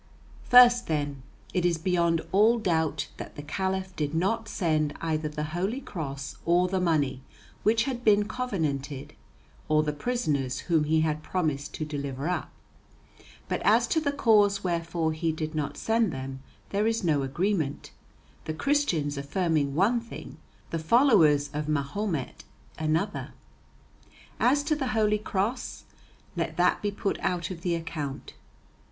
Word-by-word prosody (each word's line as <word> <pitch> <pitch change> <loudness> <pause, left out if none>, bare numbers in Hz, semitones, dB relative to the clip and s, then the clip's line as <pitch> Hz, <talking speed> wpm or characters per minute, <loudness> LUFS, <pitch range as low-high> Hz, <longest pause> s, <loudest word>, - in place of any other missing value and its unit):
First, 245 -1 +7
then, 145 -3 -2 0.3
it 180 - +1
is 175 -2 +2
beyond 170 -1 +1
all 215 +5 +5
doubt 160 -7 0
that - - -8
the 145 - -7
Caliph 190 +3 -2
did 150 0 -2
not 225 +6 0
send 155 -6 0
either 155 -2 -1
the 150 0 -4
Holy 195 +9 -1
Cross 140 - -6
or 175 +2 +3
the 190 +1 0
money 145 -7 +1 0.4
which 225 +1 +3
had 245 -2 -4
been 210 -1 +4
covenanted, 150 - -3 0.6
or 155 0 +4
the 150 -1 -1
prisoners 145 - -1
whom 160 -4 +1
he 155 +1 +2
had 155 -1 0
promised 155 -4 -2
to 155 - -3
deliver 140 -1 -4
up; 180 - -2 1.0
but - - -2
as - - +4
to 320 - +2
the 285 -2 0
cause 205 -7 +3
wherefore 165 -2 -1
he 160 +1 0
did 155 0 -4
not 150 -2 -3
send 225 -3 +1
them 135 -1 -6 0.3
there 205 +2 +1
is 225 -2 0
no 155 -5 +2
agreement, 155 +2 -1 0.5
the 155 - -3
Christians 160 - 0
affirming 145 -1 0
one 210 +8 +3
thing, 230 0 -10 0.3
the 165 - -1
followers 160 - +4
of 150 +1 -3
Mahomet 150 +1 -2 0.4
another. 160 +6 -1 1.0
As 285 +4 +3
to 305 +1 +1
the 275 -3 -2
Holy 210 -1 +3
Cross, 210 +3 -2 0.5
let - - -2
that 180 0 +3
be 205 - 0
put 200 0 -2
out 175 0 -1
of 170 -2 -7
the 175 -1 0
account. 155 -4 -5
165 Hz, 150 wpm, -27 LUFS, 150-205 Hz, 1.0 s, First